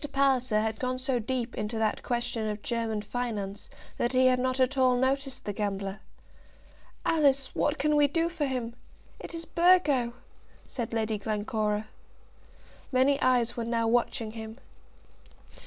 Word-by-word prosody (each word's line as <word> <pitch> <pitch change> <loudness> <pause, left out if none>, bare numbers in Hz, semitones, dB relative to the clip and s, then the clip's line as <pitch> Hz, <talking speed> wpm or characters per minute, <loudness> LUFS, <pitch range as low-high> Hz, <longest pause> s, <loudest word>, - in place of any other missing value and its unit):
Palliser 260 -5 +2
had 220 0 -2
gone 255 0 -1
so 255 -1 0
deep 235 +1 -3
into 215 +2 -3
that 220 -1 0
question 235 -2 -2
of 210 0 -5
German 225 -3 -2
finance 210 -3 -4 0.3
that 240 +2 0
he 255 0 +4
had 255 0 +4
not 255 +1 0
at 260 +1 +2
all 255 -2 +4
noticed 270 +1 -1
the 205 - -2
gambler. 195 -1 -3 1.1
"Alice, 275 -4 +3
what 295 +1 0
can 300 +2 +2
we 295 -1 +5
do 330 +3 +1
for 325 -4 -2
him? 245 -3 -3 0.5
It - - -8
is 330 0 -5
Burgo," 315 -10 +3 0.5
said 235 -4 -5
Lady 220 -2 -1
Glencora. 210 0 -1 1.0
Many 270 +2 +3
eyes 245 -2 +2
were 235 - -2
now 230 0 0
watching 230 -1 +1
him. 220 0 -8
245 Hz, 150 wpm, -28 LUFS, 220-265 Hz, 1.1 s, we